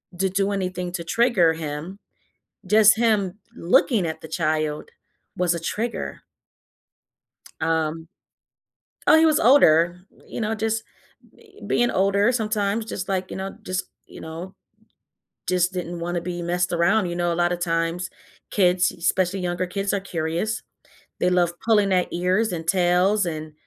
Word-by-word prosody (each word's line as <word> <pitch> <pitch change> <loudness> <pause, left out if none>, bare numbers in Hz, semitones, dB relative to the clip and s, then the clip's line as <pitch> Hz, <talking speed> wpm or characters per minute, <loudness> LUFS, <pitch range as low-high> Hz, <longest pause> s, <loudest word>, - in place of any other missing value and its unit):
d 190 +2 0
do 195 +2 0
anything 185 -2 -3
to 175 -2 -4
trigger 185 -3 +3
him. 160 +4 -6 0.7
Just 215 0 +6
him 210 -5 +1 0.2
looking 220 - +2
at 160 - -5
the 160 - -10
child 155 -1 -1 0.5
was 175 -1 +1
a 170 - -4
trigger." 225 +8 -4 1.4
Um 160 0 -1 1.0
oh, - - +7
he 320 - +5
was 310 -1 +3
older, 175 - +5 0.3
you - - -6
know; 220 0 -1
just 225 +1 -1 0.5
be 420 -2 -20
being 240 0 +2
older 200 +4 +2
sometimes 215 -2 -1
just, 190 -4 -5
like 185 -1 -1
you - - -5
know, 195 +1 -6
just 185 -2 -3 0.2
you - - -12
know, 165 +4 -8 0.9
just 180 0 +1
didn't 175 -1 -4
wanna 175 0 -2
be 175 0 -5
messed 175 +1 -1
around, 185 +4 +2
you 175 - -4
know? 175 -1 0
A - - -3
lotta 175 +1 +1
times 170 0 -1 0.4
kids, 180 -2 +3
especially 185 +2 0
younger 180 0 -2
kids, 195 +2 -2
are 200 - +1
curious. 175 +4 -3 0.6
They 180 - +3
love 175 -1 +2
pulling 210 -3 +3
their 180 -1 +2
ears 185 +4 0
and 165 -1 -5
tails 185 +3 +2
and, 155 -2 -5
180 Hz, 150 wpm, -23 LUFS, 170-205 Hz, 1.4 s, oh